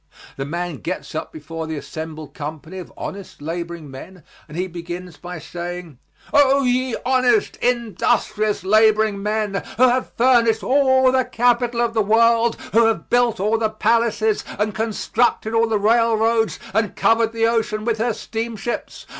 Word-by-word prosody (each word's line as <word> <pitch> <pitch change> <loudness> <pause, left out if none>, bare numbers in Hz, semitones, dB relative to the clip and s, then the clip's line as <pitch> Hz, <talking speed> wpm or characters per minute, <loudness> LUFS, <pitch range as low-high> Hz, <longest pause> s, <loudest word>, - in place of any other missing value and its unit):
The 135 - -4
man 170 0 -4
gets 180 +4 -5
up 155 - -4
before 160 +1 -7
the 160 - -4
assembled 155 0 -7
company 155 +4 -7
of 180 - -9
honest 195 -1 -7
laboring 165 -1 -6
men 165 +6 -11 0.2
and 150 - -9
he 180 - 0
begins 175 -1 -7
by 180 0 -8
saying: 175 -3 -7 0.3
"Oh, 280 -1 +5
ye 255 -1 +1
honest, 260 +10 +2
industrious 215 -3 0
laboring 215 0 +3
men, 210 -1 -1
who 255 +2 +6
have 250 +1 -1
furnished 230 -3 +3
all 260 -1 +4
the 260 0 +2
capital 240 0 +1
of 235 -1 0
the 220 - +2
world, 230 +2 +3 0.2
who 230 +1 +5
have 225 - -2
built 245 -4 +2
all 215 +3 +1
the 220 -1 +1
palaces 220 -1 +1
and 210 +1 -1
constructed 220 +1 0
all 230 0 +3
the 220 -1 +1
railroads 225 +1 +2 0.2
and 220 -1 0
covered 225 0 +2
the 225 0 +1
ocean 220 -2 0
with 230 -2 0
her 230 +1 +1
steamships. 225 0 -5
220 Hz, 155 wpm, -21 LUFS, 180-235 Hz, 0.3 s, who